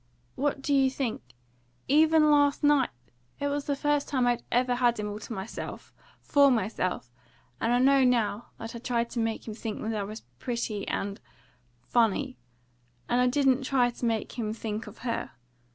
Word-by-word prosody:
"What 275 Hz, 0 st, -1 dB
do 285 Hz, -, +1 dB
you 270 Hz, -1 st, +4 dB
think? 260 Hz, -4 st, -3 dB, 0.7 s
Even 310 Hz, +1 st, +5 dB
last 285 Hz, 0 st, +3 dB
night! 290 Hz, -3 st, +4 dB, 0.5 s
It 285 Hz, -, 0 dB
was 285 Hz, 0 st, -2 dB
the 285 Hz, -, 0 dB
first 295 Hz, 0 st, 0 dB
time 260 Hz, -4 st, +1 dB
I 245 Hz, -1 st, +2 dB
ever 250 Hz, +1 st, +2 dB
had 240 Hz, -2 st, +2 dB
him 210 Hz, -, -2 dB
all 205 Hz, +1 st, -5 dB
to 220 Hz, -, -10 dB
myself, 190 Hz, -4 st, -6 dB, 0.3 s
for 285 Hz, -1 st, +4 dB
myself, 190 Hz, -, -1 dB, 0.5 s
and 230 Hz, -, 0 dB
I 245 Hz, -, +4 dB
know 270 Hz, +1 st, +5 dB
now 235 Hz, -3 st, +1 dB
that 225 Hz, +1 st, -7 dB
I -, -, -5 dB
tried 235 Hz, -1 st, -1 dB
to 240 Hz, -, -3 dB
make 225 Hz, 0 st, -2 dB
him 220 Hz, -, -4 dB
think 220 Hz, -1 st, -5 dB
that 225 Hz, +1 st, -2 dB
I 210 Hz, -, -1 dB
was 215 Hz, +3 st, -6 dB, 0.2 s
pretty 235 Hz, -5 st, -3 dB
and 200 Hz, 0 st, -3 dB, 0.6 s
funny. 240 Hz, +3 st, +1 dB, 0.7 s
And 245 Hz, -, +2 dB
I 250 Hz, -, +4 dB
didn't 265 Hz, 0 st, +3 dB
try 255 Hz, -2 st, +2 dB
to 240 Hz, -, -5 dB
make 225 Hz, +2 st, -2 dB
him 215 Hz, -2 st, -1 dB
think 220 Hz, -1 st, -5 dB
of -, -, -11 dB
her. 230 Hz, -, -2 dB
245 Hz, 185 wpm, -28 LUFS, 225-275 Hz, 0.7 s, Even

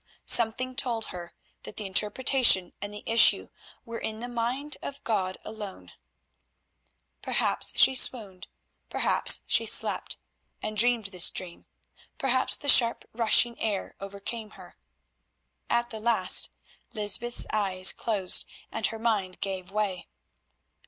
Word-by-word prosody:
Something 245 Hz, +2 st, +1 dB
told 240 Hz, -5 st, -2 dB
her 175 Hz, -1 st, -9 dB, 0.3 s
that -, -, -10 dB
the 210 Hz, -, -3 dB
interpretation 210 Hz, 0 st, +2 dB
and 205 Hz, +1 st, -5 dB
the 210 Hz, -, -8 dB
issue 230 Hz, +1 st, +4 dB, 0.4 s
were 230 Hz, -1 st, -6 dB
in 220 Hz, 0 st, -5 dB
the 240 Hz, -, -5 dB
mind 245 Hz, +5 st, -2 dB
of 280 Hz, 0 st, -8 dB
God 190 Hz, -4 st, -1 dB
alone. 210 Hz, -3 st, -8 dB, 1.3 s
Perhaps -, -, 0 dB
she 265 Hz, -, +6 dB
swooned, 215 Hz, -7 st, -2 dB, 0.4 s
perhaps -, -, +1 dB
she -, -, +1 dB
slept -, -, -1 dB, 0.4 s
and 215 Hz, 0 st, -5 dB
dreamed 235 Hz, 0 st, +3 dB
this 180 Hz, -1 st, +3 dB
dream; 175 Hz, -2 st, -5 dB, 0.5 s
perhaps 260 Hz, -1 st, +2 dB
the 285 Hz, -, -8 dB
sharp 235 Hz, -4 st, +7 dB
rushing 235 Hz, +1 st, +3 dB
air 205 Hz, -3 st, -3 dB
overcame 200 Hz, +3 st, -7 dB
her. -, -, -14 dB, 0.9 s
At 240 Hz, 0 st, 0 dB
the 220 Hz, -, -6 dB
least 235 Hz, +1 st, +2 dB, 0.5 s
Lysbeth's 220 Hz, +3 st, -1 dB
eyes 190 Hz, -3 st, +3 dB
closed 200 Hz, -5 st, -1 dB, 0.2 s
and 225 Hz, -1 st, -1 dB
her 225 Hz, -, -6 dB
mind 210 Hz, -5 st, -1 dB
gave 190 Hz, -2 st, -4 dB
way. 200 Hz, -3 st, -2 dB
220 Hz, 125 wpm, -27 LUFS, 195-240 Hz, 1.3 s, sharp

